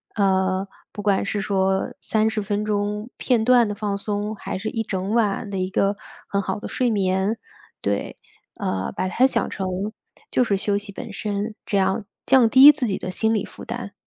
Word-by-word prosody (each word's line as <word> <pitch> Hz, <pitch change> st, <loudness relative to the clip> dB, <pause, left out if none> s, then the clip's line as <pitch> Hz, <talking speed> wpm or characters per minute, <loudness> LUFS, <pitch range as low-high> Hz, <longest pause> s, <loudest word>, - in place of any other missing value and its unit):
呃， 190 Hz, -1 st, +1 dB, 0.2 s
不 205 Hz, -, -6 dB
管 200 Hz, -2 st, +2 dB
是 205 Hz, 0 st, -1 dB
说 190 Hz, -1 st, +1 dB
30 220 Hz, 0 st, +1 dB
分 205 Hz, +1 st, -1 dB
钟 210 Hz, +2 st, -1 dB
片 240 Hz, -4 st, +2 dB
段 245 Hz, -1 st, +5 dB
的 205 Hz, -, -2 dB
放 205 Hz, -1 st, -2 dB
松， 205 Hz, +1 st, -3 dB
还 190 Hz, -, -5 dB
是 215 Hz, -, -3 dB
一 225 Hz, -, -2 dB
整 190 Hz, 0 st, -3 dB
晚 210 Hz, -1 st, +1 dB
的 195 Hz, -, -3 dB
一 185 Hz, 0 st, -2 dB
个 200 Hz, +1 st, +1 dB, 0.3 s
很 200 Hz, -, 0 dB
好 190 Hz, +1 st, -3 dB
的 -, -, -6 dB
睡 250 Hz, -1 st, 0 dB
眠。 195 Hz, +1 st, +1 dB, 0.4 s
对， 100 Hz, 0 st, -2 dB, 0.4 s
呃， 95 Hz, 0 st, -2 dB
把 185 Hz, -, -2 dB
它 245 Hz, +7 st, +3 dB
想 -, -, -1 dB
成， 190 Hz, -2 st, -3 dB, 0.6 s
就 250 Hz, -, +3 dB
是 200 Hz, -5 st, +1 dB
休 205 Hz, 0 st, +1 dB
息 205 Hz, 0 st, -5 dB
本 200 Hz, +2 st, -8 dB
身。 210 Hz, +1 st, -3 dB
这 200 Hz, -, 0 dB
样， 195 Hz, +2 st, +1 dB, 0.2 s
降 250 Hz, -4 st, +5 dB
低 270 Hz, +4 st, +10 dB
自 275 Hz, -4 st, -2 dB
己 195 Hz, -, -1 dB
的 185 Hz, -, -5 dB
心 220 Hz, +3 st, +1 dB
理 210 Hz, -, 0 dB
负 -, -, -12 dB
担。 235 Hz, -3 st, -6 dB
205 Hz, 205 characters per minute, -23 LUFS, 195-220 Hz, 0.6 s, 低